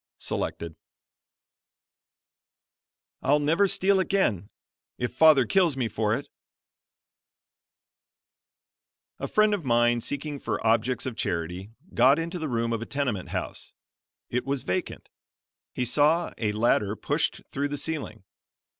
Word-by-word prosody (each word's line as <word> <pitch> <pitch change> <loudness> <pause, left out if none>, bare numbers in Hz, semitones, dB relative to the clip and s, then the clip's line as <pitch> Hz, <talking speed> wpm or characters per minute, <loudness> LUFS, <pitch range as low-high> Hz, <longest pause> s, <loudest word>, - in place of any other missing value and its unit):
Selected. 85 -1 -4 2.5
"I'LL 145 +3 +3
NEVER 160 +7 +2
STEAL 195 0 +3
AGAIN 165 - 0 0.5
IF 120 - -3
FATHER 155 -5 +6
KILLS 170 - +2
ME 125 -3 0
FOR 105 +1 0
IT" - - -6 2.9
A - - -3
friend 215 0 +3
of 200 -5 -2
mine, 120 -1 +2
seeking 145 +3 -4
for - - -3
objects 115 +2 +1
of 130 -3 -4
charity, 90 +3 -3 0.2
got 130 +4 +5
into 170 +2 -3
the 155 -2 -3
room 115 -1 -1
of 115 - -2
a 115 - -6
tenement 130 -10 -2
house. - - -5 0.6
It 125 +1 0
was 135 -1 -2
vacant. 90 - -3 0.6
He 125 - -2
saw 150 +7 +2
a 105 -3 0
ladder 105 -1 +1
pushed - - -1
through 140 +1 -1
the 145 0 -4
ceiling. 140 -9 -4
130 Hz, 125 wpm, -26 LUFS, 115-155 Hz, 2.9 s, FATHER